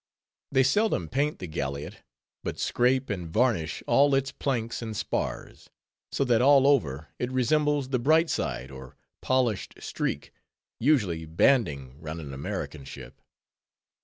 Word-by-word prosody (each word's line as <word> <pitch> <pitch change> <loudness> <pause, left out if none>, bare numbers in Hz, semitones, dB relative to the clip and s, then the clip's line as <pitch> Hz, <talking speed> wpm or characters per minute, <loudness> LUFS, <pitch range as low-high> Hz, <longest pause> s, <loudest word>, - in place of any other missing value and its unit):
They 135 -1 +4
seldom 135 - +1
paint 145 +3 0
the 95 - -6
galliot; 70 -3 -5 0.4
but - - -4
scrape 130 0 +1
and 90 -4 -4
varnish 105 -6 0
all 140 0 +4
its 135 0 0
planks 120 -4 -2
and 110 -2 -5
spars, - - -4 0.4
so - - 0
that 120 -2 +3
all 135 0 +6
over 80 - +1
it 125 +1 -2
resembles 145 +2 +1
the 130 -2 0
"bright 160 +6 +4
side" 65 +2 -3
or 65 -1 -11 0.2
polished 125 -6 0
streak, - - -4 0.5
usually 100 - +1
banding 75 - +1
round 80 +1 -6
an 70 -4 -7
American 70 +1 -5
ship. - - -11
120 Hz, 135 wpm, -27 LUFS, -, 0.5 s, all